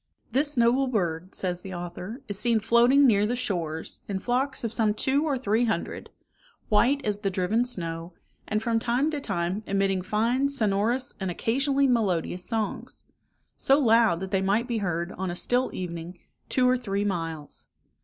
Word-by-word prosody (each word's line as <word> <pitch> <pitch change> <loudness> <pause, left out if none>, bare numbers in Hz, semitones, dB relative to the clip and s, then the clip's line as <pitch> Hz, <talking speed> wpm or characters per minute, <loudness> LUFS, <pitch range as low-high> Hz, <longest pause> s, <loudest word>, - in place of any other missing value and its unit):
"This 290 +1 +1
noble 240 +3 +3
bird," 180 -6 -2
says 180 -1 -2
the 190 -1 -7
author, 180 +8 -7
"is 205 -1 -1
seen 235 -2 +3
floating 240 +6 +5
near 210 -4 +4
the 245 - -1
shores, 170 -10 -3
in 200 - -2
flocks 250 +7 -1
of 230 -1 -2
some 215 -3 +2
two 275 +7 +1
or 285 -4 0
three 230 -1 +1
hundred, 220 - -3 0.6
white 260 +6 +3
as 205 -1 0
the 200 -2 -1
driven 195 +6 +1
snow, 165 -7 -3 0.4
and 215 +1 -1
from 230 -1 +1
time 245 +7 +1
to 295 -2 -3
time 185 -2 -2
emitting 195 -1 +1
fine 230 +8 +1
sonorous, 230 0 0
and 190 -2 -2
occasionally 275 - +1
melodious 190 -8 0
songs; 220 -3 -4 0.5
so 275 - +4
loud, 225 - +4
that 190 0 -5
they 195 -2 +1
might 205 +5 +1
be 235 -3 -1
heard, 175 -2 -2
on 190 -1 -2
a 175 - -4
still 245 +7 +1
evening, 175 -1 -6 0.3
two 255 -1 +3
or 255 0 +3
three 205 -4 -2
miles. 165 -6 -4
215 Hz, 175 wpm, -26 LUFS, 185-245 Hz, 0.6 s, floating